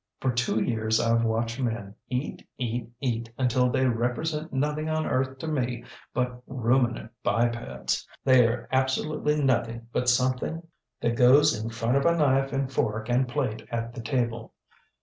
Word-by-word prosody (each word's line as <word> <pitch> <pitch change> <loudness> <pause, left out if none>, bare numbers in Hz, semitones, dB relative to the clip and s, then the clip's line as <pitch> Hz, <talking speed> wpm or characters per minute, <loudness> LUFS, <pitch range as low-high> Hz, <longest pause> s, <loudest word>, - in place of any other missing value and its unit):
For 130 - +1
two 120 -2 +1
years 110 -2 +1
IŌĆÖve 115 0 +2
watched 115 +2 -1
men 115 -5 -2 0.2
eat, 125 +3 -3
eat, 120 -1 -3
eat, 115 -3 -2
until 125 -1 +2
they 130 +1 +1
represent 130 +7 -1
nothing 150 +3 -1
on 155 0 0
earth 130 +1 0
to 160 - -6
me 125 -6 -1 0.3
but 125 -1 -2
ruminant 120 -2 0
bipeds. 120 0 -1 0.2
TheyŌĆÖre 125 -3 +4
absolutely 150 +3 +1
nothing 115 -3 0
but 125 - +2
something 130 +6 +1 0.4
that 115 0 +1
goes 130 +4 +6
in 110 +1 -4
front 115 +2 0
of 140 - +2
a 170 0 +3
knife 135 -2 +3
and 135 -1 -2
fork 110 -1 -1
and 125 +2 +2
plate 125 -3 -2
at 115 0 -3
the 120 - -6
table. 115 -2 -2
125 Hz, 155 wpm, -27 LUFS, 115-135 Hz, 0.4 s, goes